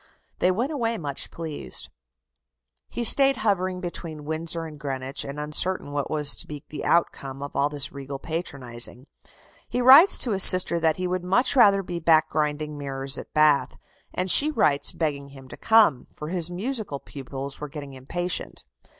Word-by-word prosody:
They 180 - +2
went 235 +10 -2
away 230 -6 -2
much 145 -6 -5
pleased. 155 - -4 1.0
He 240 - -5
stayed 270 +2 +5
hovering 185 -4 -1
between 165 -4 -7
Windsor 165 +2 -3
and 155 -2 -11
Greenwich, 135 -1 -5
and 140 +2 -8
uncertain 150 +2 0
what 145 -1 -4
was 150 -2 +2
to - - -5
be 150 -2 -9
the 150 - -7
outcome 140 -5 -1
of 140 - -9
all 140 +1 +1
this 145 -1 0
regal 140 0 -8
patronizing. 135 -6 0 0.6
He 245 - -3
writes 270 +9 +7
to 240 - +1
his 195 -2 +1
sister 185 -3 +7
that 160 -1 +1
he 185 - -5
would 180 0 -3
much 240 +10 +1
rather 200 -6 +4
be 175 -1 -6
back 160 -1 +2
grinding 150 -1 -3
mirrors 135 -1 -3
at - - -12
Bath. 150 -2 +2 0.3
And 185 0 -1
she 295 - +5
writes 145 - +2
begging 145 -4 -4
him 135 -1 -14
to - - -10
come, 215 - +2
for 150 - -8
his 175 -2 -1
musical 205 - -5
pupils 135 0 -9
were 150 - -6
getting 140 -1 -9
impatient. 175 - -5
155 Hz, 175 wpm, -24 LUFS, 140-185 Hz, 1.0 s, writes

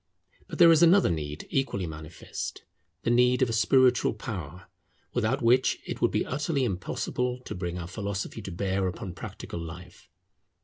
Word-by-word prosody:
But - - -7
there 170 -1 +8
is 160 -1 +5
another 175 - +6
need 75 -1 -4
equally 130 -9 0
manifest, 80 0 -7 0.4
the 115 - +1
need 125 +1 +4
of 120 - +1
a - - -2
spiritual 125 +1 +4
power, 95 -5 -6 0.5
without 120 +3 0
which 125 +3 +4
it - - -5
would - - +4
be - - 0
utterly 145 0 -1
impossible 125 +4 -2
to - - -7
bring 90 -1 -4
our 85 - -5
philosophy 100 +3 -4
to 95 - -7
bear 95 +1 -1
upon 90 0 -5
practical 85 - -7
life. 85 +2 -10
105 Hz, 165 wpm, -28 LUFS, 90-125 Hz, 0.5 s, there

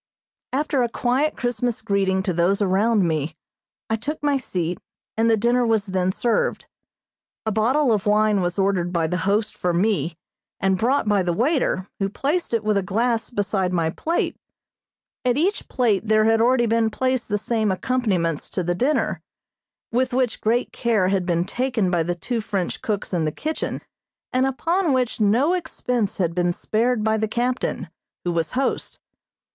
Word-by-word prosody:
After 280 0 0
a 240 - +1
quiet 255 +6 0
Christmas 245 -1 -1
greeting 195 -3 0
to 190 -2 -1
those 175 +4 +2
around 200 0 +2
me, 155 -1 -1 0.5
I 225 - 0
took 300 +7 -4
my 290 -1 +2
seat, 180 -9 -2 0.4
and 225 +1 +2
the 225 - +4
dinner 240 +3 +2
was 225 -3 +1
then 185 -2 0
served. 245 - 0 0.8
A 220 - 0
bottle 240 +5 +2
of 210 0 -1
wine 210 -1 +3
was 175 +1 -1
ordered 190 -3 +1
by 170 -2 +1
the 180 +3 -1
host 210 +1 +1
for 180 -1 -1
me, 180 -3 0 0.4
and 190 0 +2
brought 250 +2 +1
by 205 -2 +3
the 175 -1 0
waiter, 240 - +1
who 195 -1 0
placed 295 - -1
it 230 -2 0
with 215 -1 +2
a - - +2
glass 225 +4 0
beside 200 -4 -1
my 165 -2 +1
plate. 330 - -1 0.9
At 250 0 +2
each 375 +7 0
plate 220 -5 +1
there 215 0 +4
had 225 0 +3
already 240 +1 +4
been 225 0 +2
placed 255 +1 -1
the 205 - +1
same 220 -1 0
accompaniments 185 - -1
to 185 - -1
the 175 +1 0
dinner, 260 +11 0 0.7
with 255 +2 +1
which 255 -2 0
great 235 +3 0
care 220 -6 +1
had 190 -2 0
been 170 0 +1
taken 245 -5 0
by 175 -2 +2
the 175 +2 -1
two 230 +6 -3
French 195 -4 -3
cooks 205 -3 -3
in 165 -3 +1
the 155 - 0
kitchen, 310 - -3 0.5
and 255 +1 +3
upon 330 +4 +1
which 250 -3 0
no 240 - +3
expense 250 - -2
had 170 -3 0
been 175 0 +1
spared 225 +4 0
by 220 0 +2
the 220 0 0
captain, 245 +3 -1 0.4
who 175 - +1
was 165 -2 -1
host. 265 +2 -1
220 Hz, 175 wpm, -23 LUFS, 190-250 Hz, 0.9 s, the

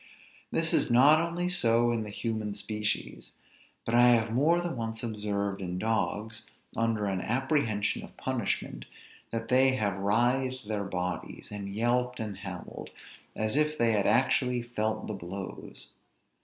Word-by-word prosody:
This - - +1
is - - +3
not 140 +6 +6
only 170 +1 -1
so 120 -9 +3
in 115 -1 0
the 105 - -5
human 110 -1 -3
species: 105 0 -3 0.5
but 115 - -2
I 120 +1 +7
have 115 -2 +4
more 155 +8 +3
than 175 -4 -3
once 115 -1 -4
observed 100 -3 -2
in 90 -1 -3
dogs, 110 +1 -1 0.3
under 115 -2 0
an 95 -2 -1
apprehension 120 - 0
of - - -13
punishment, - - -2 0.4
that 115 0 -4
they 130 +1 +5
have 100 -5 0
writhed 125 +4 +1
their 105 -2 -2
bodies, 90 -1 -4
and 100 -1 -5
yelped, 120 +4 0
and 105 -4 -4
howled, 95 -3 -7 0.5
as 110 +3 -1
if 150 +1 +2
they 115 -1 +3
had 105 -2 +2
actually 125 +2 +2
felt 110 -2 -2
the 105 - -4
blows. 95 0 -8
110 Hz, 150 wpm, -29 LUFS, 105-125 Hz, 0.5 s, I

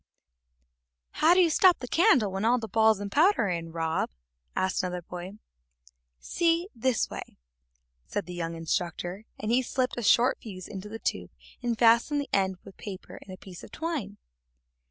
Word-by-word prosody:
"How 330 +3 +4
do 370 - +6
you 340 -2 +4
stop 365 +3 +5
the 250 - -7
candle 325 - +4
when 195 +2 -3
all 240 +3 +4
the 225 -2 -5
balls 220 -1 +3
and 200 0 -5
powder 345 - +4
are - - -1
in, 165 -2 -3
Rob?" 165 -1 -1 0.5
asked 190 0 0
another 180 -1 -4
boy. 180 +2 -7 0.9
"See, 335 - 0
this 250 0 0
way," - - -8 0.7
said 205 - -3
the 180 - -8
young 165 -1 -4
instructor, 175 +4 -3
and 215 +1 -2
he 250 +2 +4
slipped 255 0 -2
a - - -2
short 240 +3 +4
fuse 185 -5 -8
into 200 0 -8
the 225 - -6
tube - - -3 0.3
and 240 -2 -1
fastened 235 +6 +4
the 285 - -4
end 190 -1 +1
with - - -14
paper 195 -3 -9
and 190 - -12
a 185 - -8
piece 180 -2 -12
of - - -12
twine. 295 - -4
215 Hz, 180 wpm, -28 LUFS, 185-255 Hz, 0.9 s, do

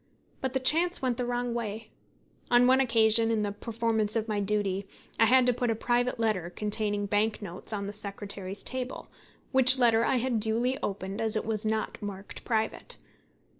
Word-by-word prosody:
But 265 -1 -3
the 265 - 0
chance 335 +7 +3
went 250 -3 -1
the 250 -1 -2
wrong 245 0 -2
way. 220 -1 -5 0.6
On 245 0 +5
one 260 +1 +4
occasion, 225 -2 +4
in 220 -2 0
the 205 - -2
performance 220 0 0
of 225 -1 -1
my 210 -2 -2
duty, 200 -1 -1 0.3
I 225 - +6
had 255 +2 +4
to 250 - +3
put 245 0 -2
a 225 - 0
private 245 +2 -1
letter 210 -7 -1
containing 205 +1 0
bank 210 +2 0
notes 190 0 -5
on 200 -2 -3
the 200 - -6
secretary's 200 -1 -5
table, 255 0 -6 0.4
which 260 -1 +6
letter 230 -2 +3
I 260 - +1
had 245 -2 0
duly 230 +4 0
opened, 195 +1 -4
as 220 -1 +4
it 215 - -2
was 220 0 -2
not 220 0 -3
marked 200 -1 -8
private. 220 -1 -3
220 Hz, 185 wpm, -28 LUFS, 205-245 Hz, 0.6 s, I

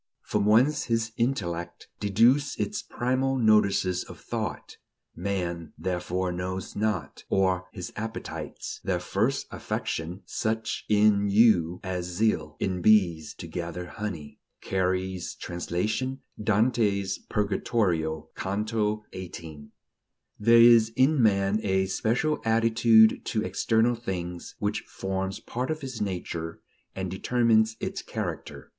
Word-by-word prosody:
"... - - -57
From 105 -1 +2
whence 130 +8 +4
his 115 -1 0
intellect 85 -9 -2
Deduced 115 +8 +3
its 210 - -2
primal 130 +2 0
notices 100 -5 +3
of - - -12
thought, - - -5 0.4
Man 85 -3 -3
therefore 90 0 -2
knows 90 +1 -4
not; 105 -8 -2
or 95 -1 +1
his 90 -1 -7
appetites 110 +1 -6
Their - - 0
first - - 0
affection; 85 +4 -4
such 110 0 -2
In 105 -1 +4
you 95 -5 +4
as 90 -2 -3
zeal 85 -6 0
In 90 -2 -1
bees 90 -6 +3
to - - -8
gather 85 +1 -5
honey." 85 -6 -6 0.2
(Carey's 95 -1 -1
translation, 105 +10 -2 0.2
Dante's 105 -3 +1
Purgatorio, 90 -7 -1
Canto 105 +2 -1
XVIII.) 80 -5 -8 0.7
There 115 +2 +6
is 115 -1 +7
in 135 +2 +4
man 100 -1 +3
a 95 -2 +1
special 120 +10 0
attitude 115 0 +5
to 110 -1 -1
external 115 +2 +2
things, 90 -7 -5
which 105 0 -1
forms 95 0 -4
part 125 +4 -4
of 155 0 -2
his 130 -4 -6
nature, 85 -4 -4 0.4
and 95 -1 -3
determines 110 +2 +2
its - - -4
character. - - -6
100 Hz, 120 wpm, -27 LUFS, 90-115 Hz, 0.7 s, is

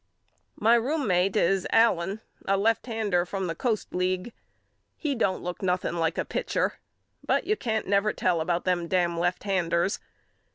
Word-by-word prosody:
My 225 +2 +4
roommate 225 - +2
is 195 -2 +2
Allen 210 -3 +3 0.3
a 195 0 +3
lefthander 220 -3 +1
from 190 +1 -3
the 165 - -2
Coast 220 +4 -2
League. 185 +4 -1 0.6
He 295 -3 -1
don't 200 -7 0
look 180 0 -5
nothing 180 -2 0
like 165 -1 0
a - - 0
pitcher - - -1 0.4
but - - +1
you 425 - +2
can't 220 - -2
never 200 +2 +2
tell 175 -3 0
about 170 +2 -1
them 175 -2 0
dam 175 -2 +1
left 175 +1 0
handers. 185 -1 0
190 Hz, 155 wpm, -27 LUFS, 175-220 Hz, 0.6 s, My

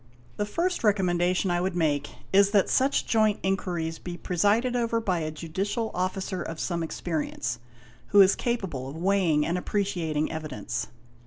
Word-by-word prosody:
The 205 - -1
first 350 - -1
recommenda 185 -4 +2
tion 185 0 0
I 175 0 +1
would 185 -1 -1
make 145 -4 +1 0.2
is 200 +1 +6
that 200 -2 +3
such 270 +1 +2
joint 215 -2 +2
inquiries 175 -4 -1
be 175 -1 -6
presided 205 +9 +1
over 230 -1 +1
by 185 -6 0
a 155 -1 -2
Judicial 190 +8 -3
Officer 185 0 -2
of 165 -2 -5
some 170 -2 -1
experience, 155 -7 -3 0.5
who 205 - +4
is 195 0 +7
capable 190 - -2
of 140 - -8
weighing 175 -4 +2
and 175 +2 0
appreciating 175 -7 -1
evidence. 155 -4 -4
185 Hz, 160 wpm, -27 LUFS, 165-205 Hz, 0.5 s, is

